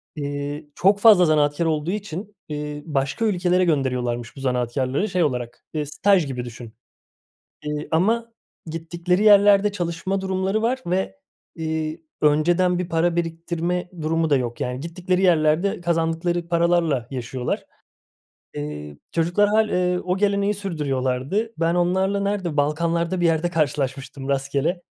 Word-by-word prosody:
eee, 145 0 -4
çok 200 +2 +3
fazla 205 -5 +7
zanaatkâr 150 +1 +2
olduğu 160 +1 0
için, 205 0 -5
eee, 150 0 -5
başka 145 +6 -1
ülkelere 180 -3 +2
gönderiyorlarmış 125 -6 -1
bu - - -10
zanaatkârları 130 - -1
şey 180 -1 +1
olarak, 125 -5 -3
eee, 155 -1 -1
staj 180 +4 +2
gibi 125 -2 -4
düşün, 120 -1 -10 0.9
eee, 150 0 -4
ama 225 +8 +1 0.3
gittikleri 170 +4 -1
yerlerde 205 0 +6
çalışma 180 +1 -2
durumları 190 +3 -1
var. 255 +3 0
Ve, 180 - -1 0.4
iii, 160 0 -3 0.2
önceden 175 +4 +3
bir 180 -1 -3
para 170 0 +1
biriktirme 170 +1 -2
durumu 160 0 0
da 140 - +5
yok, 120 -2 -3
yani, 125 +1 -2
gittikleri 180 +3 -1
yerlerde 170 +1 +3
kazandıkları 170 0 0
paralarla 170 -7 +2
yaşıyorlar. 125 -1 -3 0.9
Eee, 75 0 -6 0.2
çocuklar 175 +5 +2
hâl 215 +1 +3
eee, 180 0 +1
o 180 0 0
geleneği 200 +1 +1
sürdürüyorlardı. 150 - -2
Ben 165 +1 +1
onlarla 190 +3 +1
nerede, 200 -6 -2
balkanlarda 170 +4 0
bir 175 - +3
yerde 165 +1 +1
karşılaşmıştım 140 -3 -2
rastgele. 140 +5 -1
165 Hz, 130 wpm, -23 LUFS, 145-185 Hz, 0.9 s, fazla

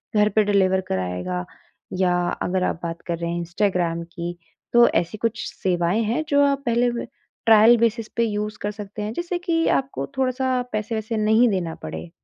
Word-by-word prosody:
घर 210 0 +4
पे 215 - +5
डिलीवर 190 -2 +2
कराएगा। 90 -1 -2 0.5
या 180 -1 +3 0.3
अगर 185 0 0
आप 165 - -1
बात 170 0 -4
कर 170 -1 -1
रहे 170 0 -3
हैं 170 - -2
इंस्टाग्राम 170 -1 -1
की, 170 0 -6 0.4
तो 240 0 +7
ऐसी 175 +5 -1
कुछ 225 0 -2
सेवाएँ 180 +3 0
हैं 235 +8 0
जो 285 0 +4
आप 280 0 0
पहले 240 0 +2
वे 235 - -4 0.4
ट्रायल 225 +1 +7
बेसिस 230 -1 +1
पे 235 - +3
यूज़ 210 -1 -2
कर 205 - -2
सकते 210 0 -8
हैं 210 +1 -3
जिससे 345 +5 -2
कि 335 -2 0
आपको 270 0 -5
थोड़ा-सा 255 -1 +1
पैसे-वैसे 220 +1 -2
नहीं 220 +3 +4
देना 175 -5 -2
पड़े। 175 - -6
210 Hz, 180 wpm, -23 LUFS, 175-235 Hz, 0.5 s, तो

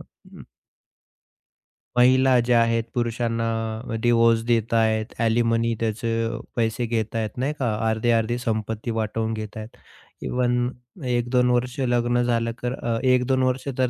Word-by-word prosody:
अं - - -16 1.6
महिला 130 +1 +5
ज्या 120 -1 +4
आहेत 115 0 +1
पुरुषांना 115 -1 -1 0.5
डिवोर्स 115 -1 +4
देत 115 -1 +1
आहेत, 110 -1 +2 0.2
अलीमनी 115 0 +2
त्याचे 115 0 -1 0.4
पैसे 115 +1 0
घेता 115 -1 -2
आहेत. 110 -1 -1
नाही 140 +4 -1
का? 120 -5 0 0.2
अर्धे-अर्धी 115 +1 +1
संपत्ती 115 -1 -3
वाटवून 110 0 -2
घेत 110 0 -6
आहेत, 110 +1 -9 0.5
इव्हन 125 0 0 0.4
1-2 125 +1 +1
वर्ष 125 +2 -1
लग्न 120 0 +1
झालं 115 -1 0
कर 125 +1 -2
अ, 115 -3 -2
1-2 130 0 +2 0.3
तर 130 -1 +2
115 Hz, 125 wpm, -23 LUFS, 115-125 Hz, 1.6 s, महिला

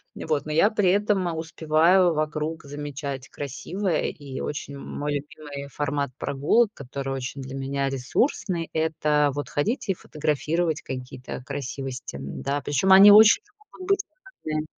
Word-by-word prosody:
Вот, 150 -2 -2
но 155 - -5
я 165 +7 +4
при 205 -4 +2
этом 195 -4 +1
успеваю 165 +3 +3
вокруг 155 +1 -2
замечать 140 -2 -6
красивое, 165 +6 -2
и 140 -3 -8
очень 145 -1 -5
мой 145 +1 -4
любимый 145 -1 -6
формат 140 -1 -2
прогулок, 175 - +2
который 135 0 -5
очень 130 +1 -5
для 130 0 -7
меня 135 0 -1
ресурсный- 165 - -1
это 150 -2 +2
вот 145 -3 -4
ходить 215 - -1
и 195 - +4
фотографировать 155 +2 -1
какие-то 125 -1 -7
красивости, 135 - -5
м, 70 0 -7
да. 140 +1 -1
Причем 145 +8 +1
они 200 +2 +10
очень 220 - +8 0.3
могут 370 +1 -9
быть 395 - +4 0.5
разные. 155 0 -1
150 Hz, 140 wpm, -25 LUFS, 140-170 Hz, 0.5 s, они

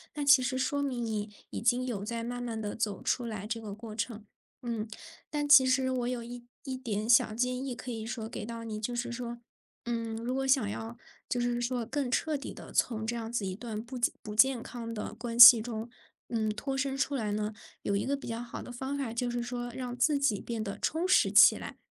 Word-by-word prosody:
那 295 -1 -2
其 280 -2 +7
实 260 0 -1
说 285 +2 0
明 255 -4 -2
你 215 -1 -3 0.2
已 - - -4
经 245 +2 +2
有 210 -6 -3
在 230 +2 -3
慢 245 0 -4
慢 230 -2 -4
地 210 -1 -4
走 210 -4 -2
出 245 - 0
来 215 -3 -5
这 225 0 -3
个 205 -2 -6
过 220 0 -9
程。 225 -1 -4 0.4
嗯， 230 -2 -3 0.4
但 295 -1 -1
其 285 -3 +9
实 260 0 +2
我 245 -2 -1
有 245 -2 -3
一 240 0 -8 0.2
一 265 -2 -4
点 220 -5 -3
小 230 -2 +5
建 250 +3 -1
议 265 -3 -4
可 250 +1 -7
以 225 -1 -4
说 225 -1 -4
给 225 - -6
到 230 +1 -6
你， 215 -2 -5
就 240 +3 -2
是 240 0 -2
说， 240 0 -5 0.5
嗯， 230 -1 -2
如 240 +2 -3
果 270 0 -1
想 260 -6 +4
要， 225 +3 -6 0.3
就 245 - 0
是 240 0 0
说 240 -1 -1
更 270 +2 -2
彻 305 +5 0
底 275 - -7
地 - - -11
从 220 -2 +1
这 235 - -2
样 225 -1 -5
子 230 -4 -1
一 185 -1 -3
段 220 -1 -5
不 245 +2 -8
健 240 - +2
不 210 - -6
健 255 +1 +4
康 230 -2 -7
的 210 -1 -5
关 235 0 -5
系 240 -2 +12
中， 225 0 -5 0.4
嗯， 220 -2 0
脱 270 +6 -3
身 270 0 -1
出 275 +1 0
来 220 -6 -1
呢， 210 +1 -2 0.3
有 200 - 0
一 200 - 0
个 280 +1 -1
比 - - -9
较 230 0 -3
好 240 - -7
的 - - -9
方 265 +3 -4
法 260 -5 -3
就 240 +1 -1
是 240 0 -2
说 245 0 -4
让 250 -2 -5
自 285 +4 +3
己 260 -8 +1
变 230 -2 -4
得 200 -2 -5
充 330 +4 0
实 370 - +4
起 - - +8
来。 - - -8
240 Hz, 260 characters per minute, -30 LUFS, 225-255 Hz, 0.5 s, 系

